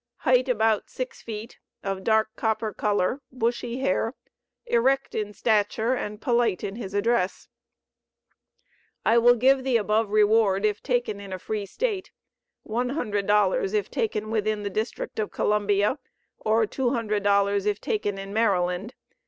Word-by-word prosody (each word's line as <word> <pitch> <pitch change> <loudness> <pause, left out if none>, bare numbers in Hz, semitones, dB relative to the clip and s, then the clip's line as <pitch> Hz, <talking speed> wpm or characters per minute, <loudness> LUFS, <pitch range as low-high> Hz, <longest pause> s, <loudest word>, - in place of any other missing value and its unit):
Height 255 0 +3
about 220 -3 +1
six 255 -1 -6
feet; 220 +1 -8 0.2
of 195 -1 -3
dark 220 0 +2
copper 220 -1 -1
color; 210 +5 0
bushy 240 0 -2
hair; 270 -3 0 0.5
erect 270 - +1
in 210 -1 -2
stature 220 +2 +1
and 210 -4 -4
polite 235 -5 +1
in 195 - -4
his 200 -4 -6
address. 205 -2 0 1.6
I 230 +1 +5
will 245 +1 +6
give 260 +3 +3
the 255 -3 +3
above 215 0 +1
reward 210 -1 +3
if 210 -1 0
taken 245 -5 -1
in 200 -1 -9
a 185 - -3
free 205 +2 -4
State; 420 - -2 0.6
$100 210 -5 +1
if 205 -1 -1
taken 215 -1 -2
within 215 -1 0
the 200 - -3
District 220 +2 -4
of 215 - -1
Columbia, 205 +3 +1 0.4
or 220 +1 +2
$200 205 -5 +1
if 205 -1 0
taken 205 -2 -2
in 195 0 -7
Maryland. 195 -1 0
215 Hz, 135 wpm, -25 LUFS, 205-235 Hz, 1.6 s, will